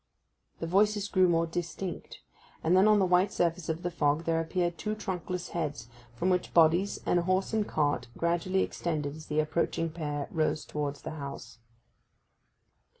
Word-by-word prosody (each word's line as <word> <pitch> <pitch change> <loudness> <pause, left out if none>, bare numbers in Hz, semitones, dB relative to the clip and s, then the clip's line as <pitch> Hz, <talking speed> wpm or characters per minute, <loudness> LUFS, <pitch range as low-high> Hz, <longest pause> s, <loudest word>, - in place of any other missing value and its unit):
The - - -4
voices 205 +3 +2
grew 185 -2 +4
more 165 -1 +3
distinct, 175 +2 -5 0.4
and 165 +3 +3
then 190 +3 +6
on 215 0 +6
the 195 - +3
white 180 +2 +3
surface 170 -1 0
of 160 +2 -2
the 175 - -1
fog 150 -1 +1
there 165 0 +1
appeared 175 +1 -1
two 215 0 -2
trunkless 180 -3 -4
heads, 145 -8 -4 0.3
from 180 +10 +1
which 180 -1 -1
bodies 170 +4 +4
and 175 - +3
a - - +1
horse 185 +4 0
and 215 -2 +1
cart 145 -3 0
gradually 175 +3 +1
extended 150 -4 -3
as 155 0 -11
the 150 0 0
approaching 165 +1 0
pair 150 -3 -3
rose 155 -2 0
towards 145 -1 -4
the - - -5
house. 140 -5 -8
170 Hz, 170 wpm, -29 LUFS, 155-185 Hz, 0.4 s, then